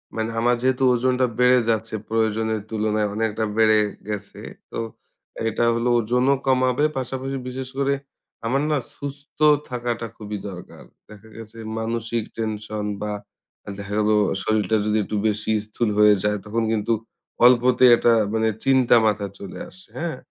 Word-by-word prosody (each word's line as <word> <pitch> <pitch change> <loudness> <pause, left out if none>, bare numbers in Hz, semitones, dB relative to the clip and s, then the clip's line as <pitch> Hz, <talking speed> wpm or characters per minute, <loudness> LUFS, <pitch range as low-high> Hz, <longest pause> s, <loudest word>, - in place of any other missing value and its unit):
মানে 110 0 -1
আমার 120 +1 +3
যেহেতু 130 0 +1
ওজনটা 125 +1 +2
বেড়ে 125 0 +6
যাচ্ছে, 110 0 0
প্রয়োজনের 110 -1 0
তুলনায় 110 -1 0
অনেকটা 110 0 -1
বেড়ে 110 -1 +5 0.3
গেছে। 105 -1 -6 0.3
তো - - -5 0.7
এটা 115 - -1
হলো 115 +1 0
ওজনও 125 +4 +2
কমাবে, 130 +2 +3
পাশাপাশি 130 +1 -3
বিশেষ 130 0 -5
করে 140 0 +2 0.5
আমার 135 +4 +1
না 150 - +2 0.2
সুস্থ 140 0 -9 0.3
থাকাটা 120 -2 -3
খুবই 105 -1 -5
দরকার। 90 -2 -11 0.3
দেখা 105 +1 -14
গেছে 115 0 -11 0.2
মানসিক 115 0 -2
টেনশন 110 -1 -3 0.2
বা, 105 0 -2 0.7
দেখা 100 0 -6
গেলো 110 - +4 0.3
শরীরটা 110 -1 +1
যদি 105 0 +1
একটু 105 - -5
বেশি 105 +1 -1
স্থূল 110 +1 -1
হয়ে 105 -1 +7
যায়, 105 0 +1
তখন 115 +2 -1
কিন্তু 110 +1 +1 0.5
অল্পতেই 125 0 +6
একটা 120 - +3 0.2
মানে 110 0 +1 0.2
চিন্তা 130 -3 +5
মাথায় 100 -2 0
চলে 100 -2 -8
আসে, 185 +2 -9
হ্যাঁ। 160 -5 -3
115 Hz, 145 wpm, -23 LUFS, 105-125 Hz, 0.7 s, হয়ে